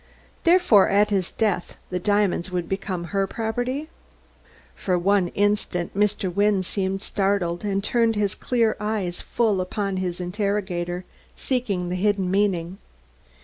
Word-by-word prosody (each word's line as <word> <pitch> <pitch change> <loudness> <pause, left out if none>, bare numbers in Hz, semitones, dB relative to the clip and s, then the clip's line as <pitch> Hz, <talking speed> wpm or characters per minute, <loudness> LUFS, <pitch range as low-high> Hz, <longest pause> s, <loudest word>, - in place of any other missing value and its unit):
"Therefore, 335 - +5
at 205 +1 +3
his 190 -3 0
death, 200 -5 -1
the 180 - -1
diamonds 205 -2 +1
would 175 -2 -2
become 195 -2 -3
her 195 -1 +1
property?" 245 +7 -2 0.9
For 185 -2 -1
one 190 +1 +2
instant 205 -4 0
Mr. 200 -3 +1
Wynne 200 0 +2
seemed 195 +1 -2
startled, 195 -4 0
and 195 -1 -1
turned 230 0 +2
his 205 -2 0
clear 230 -3 +1
eyes 210 -5 -2
full 215 -5 +1
upon 195 +1 -2
his 180 -1 -2
interrogator, 180 -2 -2 0.3
seeking 205 -9 -1
the 180 - -2
hidden 195 -1 +1
meaning. 190 -2 0
195 Hz, 135 wpm, -24 LUFS, 180-210 Hz, 0.9 s, Therefore